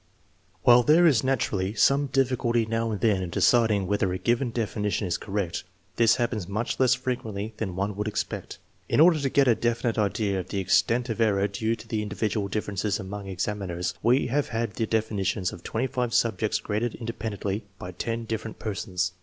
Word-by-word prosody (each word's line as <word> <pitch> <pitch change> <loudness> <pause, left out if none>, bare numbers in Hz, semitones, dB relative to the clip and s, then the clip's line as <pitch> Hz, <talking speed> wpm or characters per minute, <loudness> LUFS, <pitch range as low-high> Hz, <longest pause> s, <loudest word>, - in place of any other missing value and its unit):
While 120 0 +7
there 155 +7 +5
is 135 -9 +4
naturally 110 -7 0
some 140 +7 +3
difficulty 125 -3 +1
now 115 +1 -1
and 105 -3 -3
then 105 -5 +2
in 90 - -4
deciding 110 0 +3
whether 100 0 0
a 90 - -1
given 120 +6 +1
definition 105 -3 -2
is 90 - -1
correct, 95 -4 -3 0.3
this 115 -1 +5
hap 120 0 0
pens 105 -7 -4
much 105 +4 -2
less 130 0 +4
frequently 110 -4 -4
than 95 -6 -3
one 100 +2 -2
would 105 +1 -3
expect. 105 - -4 0.3
In - - +2
order 165 0 +6
to 140 -2 0
get 140 0 +3
a 120 - +6
definite 120 0 -1
idea 100 -1 0
of 90 - -6
the 100 - -3
extent 105 +6 +2
of 115 0 -2
error 100 -3 +3
due 110 +3 -1
to 115 - -13
the 110 -1 -1
in 105 - -4
dividual 105 0 -1
differences 105 0 -2
among 100 0 -6
examiners, 95 -2 -3
we 125 +4 +3
have 145 +4 0
had 115 -2 -2
the 110 +2 -2
definitions 100 -4 -1
of - - -10
5 125 0 -2
subjects 115 -3 +1
graded 110 +2 -2
independently 110 -3 -4
by 90 - -7
10 115 +6 -3
dif 110 -1 -2
ferent 110 - -8
persons. 95 -3 -2
110 Hz, 195 wpm, -26 LUFS, 100-120 Hz, 0.3 s, While